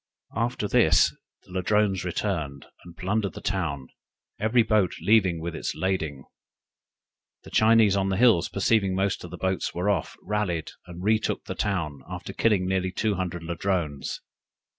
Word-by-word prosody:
After 115 0 -1
this - - +4 0.3
the - - -18
Ladrones 95 0 +1
returned, 80 -7 -3 0.2
and 85 -1 -13
plundered 100 +2 -1
the - - -8
town, 80 -10 -2 0.5
every 115 +2 +3
boat 105 -5 +2
leaving 95 -1 +3
it - - -7
with 85 0 -3
lading. 80 -8 -2 1.2
The - - -13
Chinese 110 -2 +5
on 95 0 +1
the 95 - 0
hills 110 -7 +4
perceiving 100 -1 +2
most 95 +1 0
of - - -8
the - - -8
boats 95 0 -1
were 90 +4 +1
off, 90 -6 -2
rallied, 95 -6 -2 0.2
and 90 +1 -9
retook 110 +2 +1
the - - -4
town, 85 -8 -2
after - - -6
killing 105 -5 +2
near 95 -1 0
two 105 +3 0
hundred 90 -3 -3
Ladrones. 85 -4 -2
95 Hz, 155 wpm, -26 LUFS, 85-105 Hz, 1.2 s, Chinese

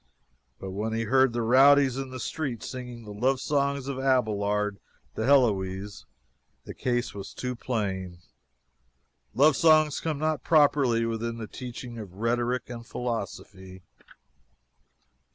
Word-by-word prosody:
But 95 - -6
when 105 +4 -3
he 115 0 -1
heard 130 +3 +3
the 120 0 -2
rowdies 135 +2 +5
in 135 0 -4
the 130 0 -7
streets 125 -2 -4
singing 125 -2 -7
the 105 -1 -9
love 130 +5 +1
songs 140 -1 -1
of 135 -2 -4
Abelard 105 -6 0 0.4
to 110 - -2
Heloise, 100 -7 +1 0.6
the - - -7
case 120 -1 -2
was 100 -1 -8
too 125 -1 -4
plain 95 -7 -3 1.2
love 145 +2 +5
songs 155 -1 +4
come 160 -3 -2
not 155 -2 -1
properly 140 -7 +3
within 115 0 -3
the 115 - -5
teachings 120 0 -8
of 95 -4 -9
rhetoric 120 +3 -1
and 120 -1 -8
philosophy. 100 -6 -6
120 Hz, 135 wpm, -27 LUFS, 105-135 Hz, 1.2 s, rowdies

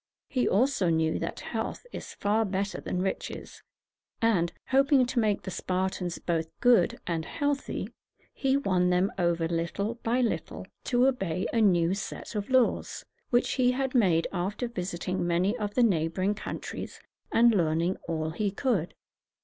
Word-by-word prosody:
He 255 -2 +1
also 210 -4 +2
knew 160 -1 +1
that - - -4
health - - -4
is - - -8
far 210 +2 +1
better 200 -1 -2
than 180 0 -2
riches; 190 - -5 0.6
and, 190 -7 +2 0.2
hoping 275 0 +4
to 245 0 -1
make 215 -3 +1
the 190 - -5
Spartans 180 -1 -2
both 165 -2 -1
good 240 -8 +4
and 165 -2 -1
healthy, 285 - -2 0.4
he 270 0 +1
won 185 -9 +2
them 180 +2 +2
over 170 -2 +1
little 185 +7 -2
by 240 +3 +1
little 235 - -2 0.2
to 245 -1 +3
obey 195 -9 0
a 230 - +3
new 175 -4 +4
set 195 +3 -6
of 205 -2 -3
laws, 255 -2 +1 0.2
which 245 0 +2
he 250 -1 +3
had 265 0 -1
made 180 -10 +3
after 195 +7 -2
visiting 180 -4 -3
many 180 +5 +2
of 205 -1 -3
the 250 - +4
neighboring 185 0 +1
countries, 210 - -6 0.3
and 235 +1 +6
learning 170 0 +1
all 160 -1 -2
he 205 +5 -1
could. 200 - -1
195 Hz, 155 wpm, -28 LUFS, 175-240 Hz, 0.6 s, and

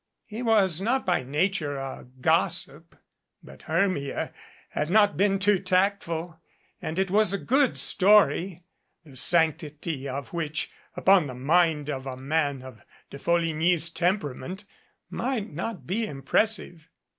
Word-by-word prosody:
He 220 +2 -7
was 200 -7 +3
not 250 +6 0
by 180 -2 +1
nature 150 +2 -1
a 135 -2 -7
gossip, 165 -1 0 0.5
but - - -14
Hermia 185 -9 -1 0.4
had 150 - -2
not 205 +1 +4
been 195 0 +2
too 200 0 +2
tactful 185 -3 -1 0.4
and 160 - -4
it 190 -1 0
was 210 -1 +3
a 200 - -1
good 265 +5 +1
story 195 -3 +3 0.4
the 140 -4 -15
sanctity 155 -2 0
of 135 +3 -6
which, 155 -3 -3 0.3
upon 190 -5 +4
the 130 - -7
mind 155 +2 +2
of 135 -1 -5
a 130 -1 -5
man 140 0 -1
of 130 -5 -12 0.3
De 140 - -9
Folligny's 165 0 +1
temperament, 180 +1 -2 0.5
might 230 - -3
not 170 - -5
be 215 - -1
impressive. 175 +2 -1
170 Hz, 135 wpm, -26 LUFS, 150-195 Hz, 0.5 s, not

